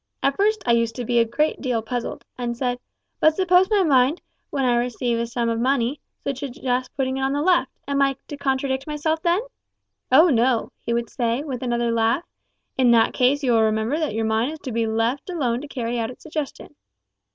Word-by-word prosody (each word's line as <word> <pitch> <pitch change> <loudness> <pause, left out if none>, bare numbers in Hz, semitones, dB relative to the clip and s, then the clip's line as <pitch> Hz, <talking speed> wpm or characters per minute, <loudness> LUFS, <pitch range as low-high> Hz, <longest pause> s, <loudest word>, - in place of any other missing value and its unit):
At 275 0 +2
first 425 0 +1
I - - +2
used 230 -1 +2
to 245 - -4
be 240 +1 +2
a 230 - +4
good 300 +7 0
deal 245 -5 -1
puzzled, 245 +1 -4
and 240 -1 -3
said, 245 -1 -1 0.4
`But 315 - +5
suppose 370 +2 +3
my 415 -3 +3
mind, 275 0 +3 0.3
when 275 -2 -1
I 245 -1 +3
receive 240 -1 -1
a 235 - -1
sum 235 0 -2
of 230 0 0
money, 260 +2 +1 0.3
should 275 -2 -2
suggest 255 -2 -2
putting 265 -1 0
it - - -3
on 270 +1 0
the 290 - 0
left, 345 -6 +3 0.2
am 280 0 +1
I 275 -1 +3
to 290 - -5
contradict 270 -1 -1
myself 315 +1 -1
then?' 345 +4 +2 0.7
`Oh 325 -1 +7
no!' 240 0 +2
he 235 - -3
would 235 -1 -1
say, 240 +2 -1
with 265 -5 -5
another 240 -2 0
laugh, 230 +6 +1 0.6
`in 250 -2 +5
that 225 -1 +4
case 270 +3 +2
you 255 - +2
will 225 -1 +4
remember 220 +6 +1
that 305 -9 -2
your 225 0 0
mind 220 +6 0
is 315 - -9
to 260 - -5
be 230 0 0
left 225 +8 -1
alone 255 -9 -1
to 295 - -8
carry 240 -3 -3
out 225 - -2
its 255 - -12
suggestion.' 300 -2 -5
255 Hz, 220 wpm, -23 LUFS, 235-290 Hz, 0.7 s, `Oh